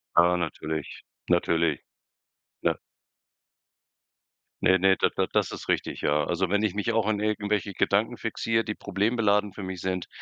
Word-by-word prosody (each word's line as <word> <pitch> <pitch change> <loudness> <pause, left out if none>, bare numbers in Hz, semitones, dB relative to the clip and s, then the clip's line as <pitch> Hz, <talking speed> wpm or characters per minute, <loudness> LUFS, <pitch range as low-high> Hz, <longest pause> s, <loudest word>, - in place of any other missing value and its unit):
Aber 90 +1 +5
natürlich. 80 -2 -4 0.3
Natürlich. 85 -3 +2 0.8
Ne - - +1 1.9
Ne, 95 0 +5
ne, 95 +1 +5
da - - +3
da - - +2
das - - +1
ist - - -8
richtig, - - -1
ja. 75 +1 +2
Also, 90 +1 0
wenn 105 +2 +1
ich 105 -4 +1
mich 105 +3 -1
auch 110 -2 +2
an 110 -1 +1
irgendwelche 105 -1 -1
Gedanken 110 +6 +1
fixiere, 115 0 0
die 110 - -3
problembeladend 105 -1 +1
für 100 - -7
mich 95 -1 -5
sind, 90 -1 -2
100 Hz, 155 wpm, -27 LUFS, 90-105 Hz, 1.9 s, Aber